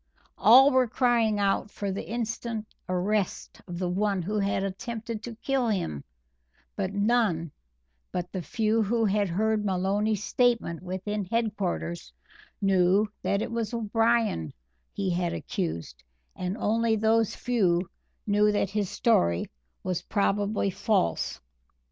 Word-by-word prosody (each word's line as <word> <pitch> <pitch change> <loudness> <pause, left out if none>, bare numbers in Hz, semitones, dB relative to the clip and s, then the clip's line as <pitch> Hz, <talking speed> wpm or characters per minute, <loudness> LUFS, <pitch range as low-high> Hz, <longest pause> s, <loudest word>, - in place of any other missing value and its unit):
All 255 +8 +8
were 260 -2 +4
crying 230 -3 +2
out 200 +1 +1
for 200 -1 -4
the 190 - -5
instant 230 -1 -3 0.2
arrest 190 +2 -1
of 175 - -6
the 180 0 -1
one 195 +1 0
who 210 +4 -1
had 195 -1 0
attempted 225 +3 -5
to 235 0 -7
kill 260 +1 0
him, 175 - -2 0.7
but 195 -2 -2
none 200 -6 +1 0.6
but 180 0 -3
the 185 - -3
few 225 +2 +1
who 225 +2 +1
had 205 -1 +1
heard 215 +4 +1
Maloney's 200 +2 0
statement 235 -9 +1
within 190 +3 -3
headquarters 200 -5 -2 0.5
knew 195 +2 +4
that 200 +1 0
it - - -5
was 230 -1 -2
O'Brien 225 - +1 0.4
he 195 -2 -2
had 175 0 0
accused 160 - -4 0.3
and 185 +3 -3
only 225 +1 +1
those 220 0 +2
few 185 -8 +1 0.4
knew 210 0 +3
that 200 -2 0
his 205 -2 -1
story 85 - +2 0.3
was 180 -2 -2
probably 205 0 0
false. 200 - 0
205 Hz, 130 wpm, -27 LUFS, 185-225 Hz, 0.7 s, All